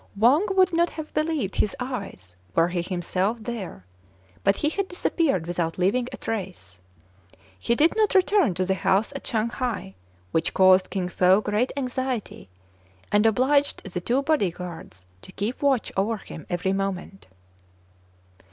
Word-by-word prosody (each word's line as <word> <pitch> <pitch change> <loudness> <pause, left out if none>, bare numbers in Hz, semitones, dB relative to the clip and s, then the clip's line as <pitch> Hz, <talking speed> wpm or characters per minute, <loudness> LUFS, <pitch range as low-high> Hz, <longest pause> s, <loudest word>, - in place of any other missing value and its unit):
Wang 270 - +4
would 375 -1 +4
not 340 +1 +3
have 310 -1 -8
believed 305 - -1
his 210 - +1
eyes 200 - -6 0.2
were 165 +1 +4
he 175 -1 -1
himself 185 +4 -1
there, 205 - -6 0.6
but 200 - +4
he 300 - 0
had 395 +4 -2
disappeared 325 - 0
without 170 -1 -2
leaving 210 +7 +1
a - - -7
trace. 180 - -5 0.8
He 235 - +1
did 315 +6 +3
not 430 -2 +2
return 375 - +4
to 185 +1 0
the 190 - +1
house 195 +6 +1
at 275 - -7
Shang 225 -2 0
hai; 235 - -3 0.4
which 160 - 0
caused 185 0 +5
Kin 185 -3 -2
Fo 180 +2 +4
great 215 +4 0
anxiety, 255 - -3 0.6
and 210 +2 +4
obliged 280 +6 +2
the 180 - -2
two 250 +9 +1
body 290 - +2
guards 170 - -9 0.2
to - - -13
keep 215 +5 -3
watch 275 -4 +1
over 215 +4 0
him 160 -5 -11
every 180 +2 0
moment. 195 0 -4
210 Hz, 155 wpm, -25 LUFS, 185-270 Hz, 0.8 s, caused